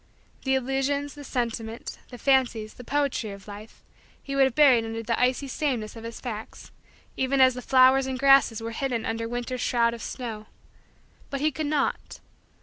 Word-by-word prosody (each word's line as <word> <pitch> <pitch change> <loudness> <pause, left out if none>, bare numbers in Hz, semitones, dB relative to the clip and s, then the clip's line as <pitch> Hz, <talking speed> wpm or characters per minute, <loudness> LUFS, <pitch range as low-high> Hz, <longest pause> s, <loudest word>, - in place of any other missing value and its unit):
The 265 0 +2
illusions, 270 +2 -1
the 290 - -10
sentiment, 230 -3 -4
the 245 - -9
fancies, 240 -5 +1
the 250 - -11
poetry 280 -4 -1
of 200 0 -10
Life, 210 +2 -11 0.4
he 275 - -6
would 275 -1 +5
have 265 - -1
buried 265 -6 +6
under 225 0 -5
the 230 +1 -1
icy 255 +2 +1
sameness 250 -6 -2
of 225 - -9
his 230 0 -7
facts, 225 -3 -7 0.4
even 265 +1 0
as 260 -1 +6
the 250 - -6
flowers 260 +1 +5
and 260 -1 -3
grasses 270 -4 +4
were 230 - -4
hidden 240 -1 -2
under 230 0 -3
winter's 245 +1 -4
shroud 235 -2 +2
of 235 - -8
snow. 220 -4 -6 0.8
But 275 - -3
he 310 +1 +2
could 300 +2 -3
not. 290 -2 -1
250 Hz, 180 wpm, -26 LUFS, 230-270 Hz, 0.8 s, buried